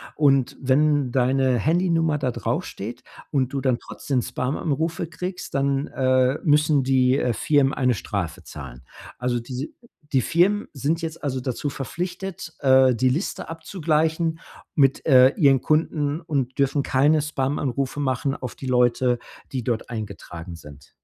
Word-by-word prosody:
Und 135 -4 +2
wenn 140 0 +2
deine 130 0 +2
Handynummer 165 - +1
da 130 -3 -1
draufsteht 115 +1 -4 0.3
und 135 -2 0
du 135 - -1
dann 130 -2 +1
trotzdem 130 -3 -3
Spam-Anrufe 150 +7 -2
kriegst, 180 +2 -6
dann, 140 +1 0
äh, 130 +1 +2
müssen 150 -2 +3
die, 130 0 +3
äh, 125 - 0
Firmen 140 +1 +2
eine 125 -1 +2
Strafe 100 -7 -4
zahlen. 65 -5 -10 0.4
Also, 125 -1 -1
diese 125 +4 -5 0.5
die 130 - +4
Firmen 185 - +2
sind 150 +4 -1
jetzt 165 0 -6
also, 130 -3 -2
dazu 130 +3 -3
verpflichtet, 175 +4 -5
äh, 130 -2 +5
die 130 +3 +2
Liste 155 +10 -3
abzugleichen 160 -1 -1 0.4
mit, 135 -3 +3
äh, 130 -3 +7
ihren 140 - +4
Kunden 155 0 0
und 140 -6 -2
dürfen 140 +1 +2
keine 145 +4 +3
Spam-Anrufe 140 -2 -2
machen 135 0 -1
auf 125 -4 -6
die 135 - -7
Leute, 125 0 +2 0.3
die 130 -3 -3
dort 115 -1 -2
eingetragen 95 -6 -7
sind. 75 -4 -14
135 Hz, 145 wpm, -23 LUFS, 125-155 Hz, 0.5 s, äh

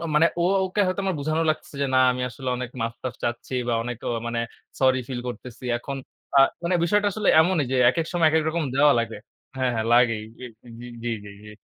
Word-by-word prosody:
মানে 160 +2 +6 0.2
উম 180 +3 +3
ও 190 - +2
ওকে 190 +3 -1
হয়তো 185 +2 -1
আমার 190 -2 0
বুঝানো 155 +3 0
লাগতেছে 155 -2 -5
যে - - +2
না - - +5
আমি 125 - -5
আসলে 130 +2 -7
অনেক 125 -1 -5
মাফ-টাফ 115 +2 -4
চাচ্ছি 120 +2 -3
বা - - +1
অনেক 120 +1 -4
অ - - 0 0.2
মানে 120 0 -1 0.4
সরি 130 -1 +3
ফিল 125 -2 -4
করতেছি। 125 +1 -9
এখন 135 +3 -6 0.4
আ - - +9 0.2
মানে 170 +2 0
বিষয়টা 205 +4 +2
আসলে 210 +1 -1
এমনই 165 -2 +2
যে - - +2
একেক 165 +3 -2
সময় 170 -3 +4
একেক 160 0 +2
রকম 165 0 -1
দেওয়া 145 +2 +5
লাগে 115 -1 -2 0.4
হ্যাঁ, 130 -1 +1
হ্যাঁ, 110 0 -1
লাগেই। 115 -3 +3 0.2
এ - - -5 0.2
হু, - - -16
হু, 120 - -8 0.2
জি, 120 - -2 0.2
জি, - - -9 0.2
জি। - - -10
130 Hz, 225 wpm, -24 LUFS, 120-165 Hz, 0.4 s, আ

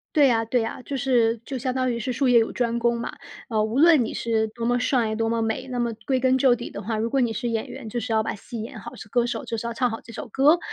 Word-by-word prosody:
对 290 -2 +6
呀 230 -3 +2
对 235 +2 +1
呀， 225 +3 -4
就 275 +2 -4
是 235 -3 +2
就 270 - -4
相 255 +1 -2
当 255 0 0
于 235 - -2
是 235 +2 -2
术 260 +2 +1
业 245 -1 +6
有 225 - +3
专 235 -1 -1
攻 235 0 +1
嘛。 - - -4 0.3
呃， 220 -3 +1
无 220 +5 -1
论 320 -4 +6
你 - - -4
是 225 -1 0
多 230 +1 -5
么 245 +1 +2
帅 240 -3 +1
多 225 0 0
么 230 0 0
美， 225 +4 -2
那 250 -1 -3
么 235 -1 0
归 265 -2 +1
根 260 0 +3
究 260 -1 +5
底 240 0 -4
的 200 - -7
话， 220 +2 -2
如 225 +2 -1
果 270 +2 +1
你 240 -2 +1
是 225 +2 -3
演 225 -2 -2
员， 225 - -8
就 230 - -5
是 230 - -4
要 220 0 +3
把 220 - -3
戏 225 +2 -7
演 225 +1 -7
好， - - -9
是 - - -10
歌 235 +3 +1
手 240 - -3
就 230 - -3
是 225 - -5
要 235 - -3
唱 250 +1 +1
好 225 - -5
这 230 - -12
首 240 - -7
歌。 285 +8 +4
235 Hz, 335 characters per minute, -24 LUFS, 225-255 Hz, 0.3 s, 对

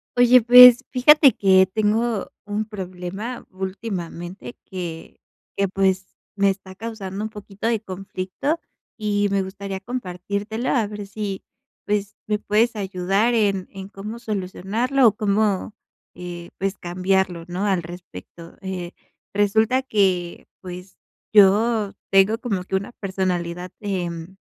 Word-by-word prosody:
Oye, 245 0 +6
pues 250 +2 +9
fíjate 275 +2 +6
que 190 -1 +5
tengo 220 +1 0
un 210 +1 -2
problema 195 +3 -6
últimamente 185 - -6
que 170 -3 -7 0.4
que 200 - +1
pues 190 0 +1 0.3
me 200 -1 +3
está 190 -1 -9
causando 205 -2 -6
un 220 - -3
poquito 205 0 -6
de 230 -1 +1
conflicto 195 - -4 0.4
y 205 -2 0
me 200 -1 +2
gustaría 195 0 -6
compartírtelo 205 +1 -4
a 235 -5 +2
ver 205 -1 -7
si 200 -1 -5 0.4
pues. 205 0 -1
me 210 -1 0
puedes 225 +3 +1
ayudar 195 +3 0
en 200 -5 +1
en 195 0 -9
cómo 210 +3 -7
solucionarlo 220 +5 0
o - - +5
cómo, 210 -1 0 0.4
eh, 175 -1 -8
pues 195 0 -2
cambiarlo, 180 0 0
¿no?, 180 +3 -3
al 190 -4 +1
respecto. 170 - -11
Eh, 185 -2 -5 0.4
resulta 220 +5 +2
que 190 -7 0
pues 180 0 -9 0.4
yo 210 +1 +4 0.2
tengo 195 +3 +5
como 200 -7 -2
que 190 - -3
una 195 +3 -2
personalidad, 180 -2 -3
em, 180 -3 -4
195 Hz, 125 wpm, -22 LUFS, 185-215 Hz, 0.4 s, pues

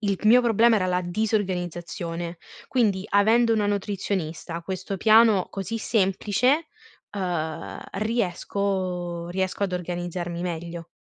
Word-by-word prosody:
il 200 -3 0
mio 245 +3 +7
problema 230 0 +4
era 185 - +1
la 180 0 +1
disorganizzazione, 175 -3 -2 0.3
quindi 205 -7 +1
avendo 225 +3 +4
una 210 -2 +1
nutrizionista, 190 -5 -2
questo 190 +2 -5
piano 220 -2 +5
così 205 +4 -4
semplice, 220 - +1 0.5
uhm, 175 -5 -3
riesco 185 -4 -2
riesco 190 +2 -2
ad 195 - 0
organizzarmi 175 -1 -3
meglio. 170 -1 -5
190 Hz, 110 wpm, -25 LUFS, 175-215 Hz, 0.5 s, mio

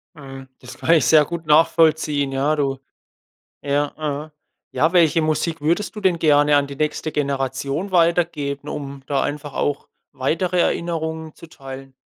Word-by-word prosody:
Mhm, 135 -3 -10
das 125 +1 -12
kann - - 0
ich 155 - +3
sehr 155 -2 +6
gut 170 0 -6
nachvollziehen. 155 -2 +3
Ja, 140 +3 +1
du 135 -2 -1 0.8
Ja, 145 0 -1
ja. 150 0 -4 0.4
Ja, 160 - +2
welche 165 -3 +4
Musik 155 +1 -1
würdest 170 +8 -1
du - - -5
denn 185 -3 +2
gerne 145 -2 +4
an 140 - +1
die 140 - -8
nächste 155 +2 -2
Generation 140 +4 -2
weitergeben, 165 -5 +1
um 140 -2 -7
da 140 -1 0
einfach 145 -1 -5
auch 145 -1 -2 0.3
weitere 170 +7 -1
Erinnerungen 160 -2 -2
zu - - -13
teilen? 135 -2 -10
150 Hz, 155 wpm, -21 LUFS, 140-160 Hz, 0.8 s, sehr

